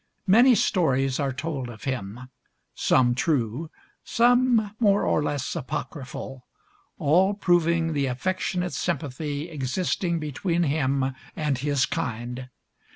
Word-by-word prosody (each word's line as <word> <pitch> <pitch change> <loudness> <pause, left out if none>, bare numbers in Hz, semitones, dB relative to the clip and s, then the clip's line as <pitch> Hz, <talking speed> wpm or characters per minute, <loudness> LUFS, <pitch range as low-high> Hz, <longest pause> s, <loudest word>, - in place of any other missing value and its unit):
Many 235 +6 +6
stories 135 -10 +1
are 140 -2 0
told 135 -2 -4
of 110 -2 -11
him; 120 -4 -4 0.5
some 125 -2 +3
true, 135 +1 -1 0.3
some 240 -3 +3
more 205 -3 +3
or - - +2
less 145 -2 -2
apocryphal, 130 0 -6 0.5
all 185 +7 +3
proving 170 -4 +2
the 140 -2 0
affectionate 180 +6 -2
sympathy 150 -2 -3
existing 170 +4 -1
between 165 +3 -1
him 135 -3 0 0.2
and 150 -4 -1
his 140 -1 +1
kind. 125 -3 -4
150 Hz, 110 wpm, -25 LUFS, 130-175 Hz, 0.5 s, Many